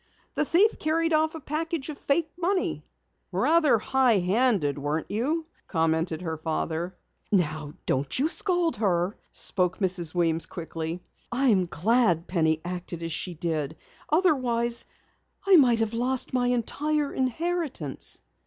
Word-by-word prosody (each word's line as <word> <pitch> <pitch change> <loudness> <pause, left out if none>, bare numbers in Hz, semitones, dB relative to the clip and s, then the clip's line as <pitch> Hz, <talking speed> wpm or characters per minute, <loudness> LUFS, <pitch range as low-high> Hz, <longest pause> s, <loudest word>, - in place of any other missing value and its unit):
The 300 - 0
thief 390 +9 +3
carried 325 +1 +1
off 315 +1 +2
a - - -5
package 315 0 -3
of 300 - -4
fake 305 +2 0
money." 365 +2 -1 0.5
"Rather 315 -7 +4
high 255 0 +3
handed 185 - +1
weren't 150 +3 -2
you?" 295 +10 -1 0.2
commented 160 0 0
her 160 -2 -3
father. 165 +3 -3 0.3
"Now 155 -6 0
don't 135 +1 0
you 275 +4 +2
scold 350 -1 0
her," 185 -2 +1 0.2
spoke 180 -1 0
Mrs. 180 -4 0
Weems 165 -2 +1
quickly. 165 0 -5 0.3
"I 260 +2 +2
am 190 -5 +3
glad 175 -1 +2
Penny 160 -3 +1
acted 175 -1 -5
as 165 - -3
she 175 +3 -3
did. 155 -2 -2 0.3
Otherwise, 255 -8 +1 0.6
I 390 -2 +7
might 240 -6 +5
have 225 0 0
lost 250 +3 +1
my 250 -1 +2
entire 285 +5 0
inheritance." 265 - -1
225 Hz, 135 wpm, -26 LUFS, -, 0.6 s, I